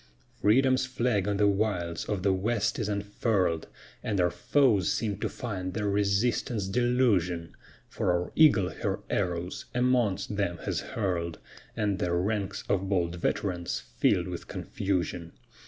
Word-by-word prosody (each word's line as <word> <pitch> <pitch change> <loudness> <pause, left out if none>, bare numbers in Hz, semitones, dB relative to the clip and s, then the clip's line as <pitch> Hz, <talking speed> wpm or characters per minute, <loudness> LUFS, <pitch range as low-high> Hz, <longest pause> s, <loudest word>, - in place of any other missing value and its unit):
Freedom's 130 +4 +4
flag 120 -6 0
on 100 -1 0
the 105 0 +4
wilds 95 -5 0
of 100 -4 -2
the 95 -1 +3
west 105 +5 0
is 110 -2 -1
unfurl'd, 100 -4 0 0.3
And 100 -3 -1
our 90 -1 +3
foes 100 - +2
seem 105 -3 -1
to - - -1
find 95 -6 -5
their 105 -2 -1
resistance 105 +2 +1
delusion; 100 -8 +1 0.3
For - - 0
our 90 0 -1
eagle 115 - +5
her - - -3
arrows 90 -2 -2
amongst 125 -5 +1
them 85 -4 0
has - - -1
hurl'd 85 -6 -2 0.4
And 100 -3 0
their 85 -1 0
ranks 100 +2 -1
of 95 -1 0
bold 85 -3 0
veterans 90 0 -1 0.2
fill'd 90 0 +3
with 90 -2 -6
confusion. 90 -3 -3
100 Hz, 140 wpm, -28 LUFS, 90-110 Hz, 0.4 s, eagle